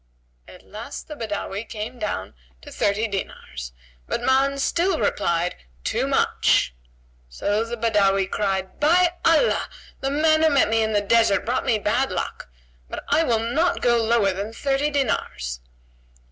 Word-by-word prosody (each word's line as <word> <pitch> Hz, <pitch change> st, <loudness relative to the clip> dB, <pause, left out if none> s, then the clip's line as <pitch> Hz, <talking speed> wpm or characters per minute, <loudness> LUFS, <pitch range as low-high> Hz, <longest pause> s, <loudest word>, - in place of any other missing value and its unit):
At -, -, -14 dB
last 230 Hz, +7 st, -8 dB
the 300 Hz, -, -7 dB
Badawi 205 Hz, -3 st, -4 dB
came 230 Hz, +2 st, -7 dB
down 205 Hz, -, -3 dB, 0.3 s
to -, -, -11 dB
thirty 205 Hz, +3 st, 0 dB
dinars; 185 Hz, -, -6 dB, 0.4 s
but 235 Hz, -, -2 dB
Ma'an 270 Hz, +2 st, +2 dB
still 340 Hz, +5 st, +1 dB
replied, 170 Hz, +1 st, 0 dB, 0.3 s
"Too -, -, 0 dB
much!" -, -, +2 dB, 0.6 s
So 205 Hz, -, -1 dB
the 235 Hz, +1 st, -5 dB
Badawi 200 Hz, -4 st, +2 dB
cried, 190 Hz, -1 st, -2 dB
"By 345 Hz, +4 st, +4 dB
Allah, 330 Hz, +9 st, +3 dB, 0.3 s
the 270 Hz, -, -1 dB
man 315 Hz, +2 st, +3 dB
who 320 Hz, -, +5 dB
met 280 Hz, -2 st, +3 dB
me 225 Hz, 0 st, +2 dB
in 220 Hz, 0 st, 0 dB
the 205 Hz, -, +3 dB
desert 215 Hz, -1 st, +3 dB
brought 245 Hz, +2 st, -1 dB
me 225 Hz, -, +3 dB
bad 230 Hz, +4 st, 0 dB
luck! 175 Hz, -, -4 dB, 0.4 s
But -, -, -6 dB
I -, -, +4 dB
will 230 Hz, -6 st, 0 dB
not 345 Hz, +3 st, +1 dB
go 240 Hz, -1 st, +4 dB
lower 220 Hz, -4 st, +2 dB
than 200 Hz, +4 st, -5 dB
thirty 275 Hz, +4 st, 0 dB
dinars." 140 Hz, -, -2 dB
225 Hz, 155 wpm, -23 LUFS, 200-275 Hz, 0.6 s, who